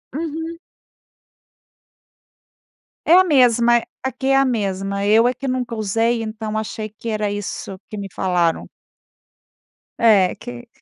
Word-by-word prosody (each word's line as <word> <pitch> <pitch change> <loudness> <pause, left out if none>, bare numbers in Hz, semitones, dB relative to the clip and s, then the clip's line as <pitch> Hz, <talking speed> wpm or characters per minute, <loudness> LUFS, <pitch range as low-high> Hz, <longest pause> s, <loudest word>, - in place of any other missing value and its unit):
Uhum. 325 +1 -4 2.5
É 330 - +5
a 370 +1 +8
mesma, 240 -6 +4 0.2
aqui 265 0 -3
é 270 - +4
a 270 0 +4
mesma, 200 -4 -2
eu 220 +3 +5
é 250 - +1
que 270 +2 -6
nunca 250 -2 -2
usei, 225 +2 0
então 215 0 -4
achei 215 0 -4
que 220 +2 -8
era 215 -1 -1
isso 205 -1 -5
que 215 - -7
me 200 - -5
falaram. 175 -3 0 1.3
É 205 -6 +4
que 245 +1 -10
225 Hz, 130 wpm, -20 LUFS, 205-255 Hz, 2.5 s, a